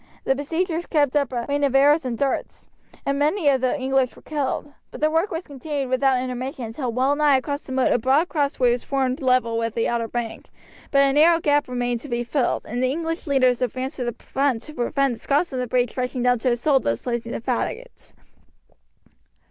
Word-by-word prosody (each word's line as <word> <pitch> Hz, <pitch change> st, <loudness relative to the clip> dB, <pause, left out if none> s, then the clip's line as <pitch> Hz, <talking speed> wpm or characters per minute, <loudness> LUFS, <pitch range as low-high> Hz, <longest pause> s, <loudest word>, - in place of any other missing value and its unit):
The -, -, +2 dB
besiegers 325 Hz, +5 st, -2 dB
kept 290 Hz, -3 st, +1 dB
up 280 Hz, -3 st, +1 dB
a 240 Hz, -2 st, -2 dB
rain 285 Hz, 0 st, 0 dB
of 275 Hz, -2 st, +1 dB
arrows 290 Hz, +2 st, +5 dB
and 240 Hz, -2 st, -2 dB
darts, 275 Hz, +1 st, -2 dB, 0.4 s
and 275 Hz, 0 st, 0 dB
many 305 Hz, +3 st, +1 dB
of 265 Hz, -2 st, +2 dB
the 260 Hz, +3 st, 0 dB
English 265 Hz, -1 st, +1 dB
were -, -, -17 dB
killed. 290 Hz, -1 st, -3 dB, 0.2 s
But -, -, -10 dB
the 310 Hz, +1 st, +2 dB
work 325 Hz, +5 st, +1 dB
was 335 Hz, 0 st, -4 dB
continued 280 Hz, -1 st, -4 dB
without 260 Hz, 0 st, +3 dB
intermission 255 Hz, 0 st, -4 dB
until 240 Hz, +2 st, -4 dB
well 260 Hz, +4 st, +1 dB
nigh 295 Hz, -2 st, +4 dB
across 285 Hz, +2 st, -3 dB
the -, -, -11 dB
moat 260 Hz, 0 st, +2 dB
a -, -, +2 dB
broad 270 Hz, +8 st, +3 dB
crossway 280 Hz, -6 st, +1 dB
was 240 Hz, 0 st, -1 dB
formed 270 Hz, +1 st, -1 dB
level 255 Hz, -3 st, +2 dB
with 230 Hz, -1 st, -2 dB
the 230 Hz, -, +1 dB
outer 235 Hz, -1 st, -1 dB
bank, 235 Hz, -1 st, -5 dB, 0.4 s
but 275 Hz, -1 st, +4 dB
a 275 Hz, -1 st, +3 dB
narrow 330 Hz, +3 st, +5 dB
gap 290 Hz, -2 st, +2 dB
remained 245 Hz, -1 st, -1 dB
to 285 Hz, -, -11 dB
be 240 Hz, 0 st, -1 dB
filled, 245 Hz, +1 st, -1 dB
and 240 Hz, +3 st, -3 dB
the 255 Hz, -, +2 dB
English 330 Hz, +4 st, -3 dB
leaders 255 Hz, -3 st, +3 dB
advanced 255 Hz, +3 st, -3 dB
to 255 Hz, -, -2 dB
the 240 Hz, -1 st, -2 dB
front 270 Hz, -4 st, -1 dB
to 305 Hz, -, -9 dB
prevent 275 Hz, +1 st, 0 dB
the 230 Hz, -, -9 dB
Scots 290 Hz, +3 st, 0 dB
on 255 Hz, -, -2 dB
the 250 Hz, -, -2 dB
breach 245 Hz, 0 st, 0 dB
rushing 250 Hz, -1 st, -2 dB
down 245 Hz, -1 st, +3 dB
to 250 Hz, +2 st, +1 dB
assault 265 Hz, +3 st, +2 dB
those 115 Hz, 0 st, -2 dB
placing 235 Hz, -1 st, -3 dB
the -, -, -3 dB
faggots. 270 Hz, -, -4 dB
265 Hz, 220 wpm, -23 LUFS, 245-290 Hz, 0.4 s, arrows